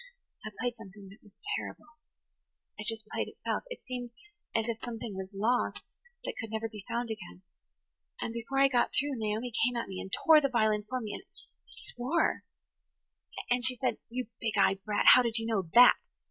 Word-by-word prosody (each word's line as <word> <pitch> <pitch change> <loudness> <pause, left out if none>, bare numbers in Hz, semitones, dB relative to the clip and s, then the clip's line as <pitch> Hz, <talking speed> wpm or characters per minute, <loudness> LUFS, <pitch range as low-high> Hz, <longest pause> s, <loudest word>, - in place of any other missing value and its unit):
I 215 - -4
played 245 0 -1
something 200 -2 -12
that 200 - -16
was 205 -2 -21 0.2
terrible–it 305 -7 -12
just 225 -1 -1
played - - -2
itself–it - - -5
seemed 250 -2 -5 0.5
as 225 0 +1
if 230 -1 -2
something 230 -3 -5
was 190 0 -5
lost 220 +5 0 0.4
that - - -3
could 225 - -6
never 220 +1 -2
be 215 -3 -10
found 235 -1 -2
again. 190 -3 -8 0.8
And 225 - -3
before 235 +4 -4
I 275 - +7
got 250 -3 +1
through 285 0 +1
Naomi 220 +3 -2
came 245 +1 +2
at 235 - -2
me, 190 -1 -5
and 190 - -8
tore 315 - +6
the 275 - +1
violin 215 -4 +2
from 255 -1 -2
me, 210 - -5
and–swore. 310 -5 -3 1.1
And 245 0 +2
she 255 0 +4
said, 255 +1 -1
'You 245 0 -4
big 220 -2 -2
eyed 195 0 +3
brat, 210 -1 0
how 255 - +7
did 235 -2 0
you 225 - -2
know 200 -7 -1
that? 245 +1 +9
230 Hz, 180 wpm, -30 LUFS, 210-250 Hz, 1.1 s, that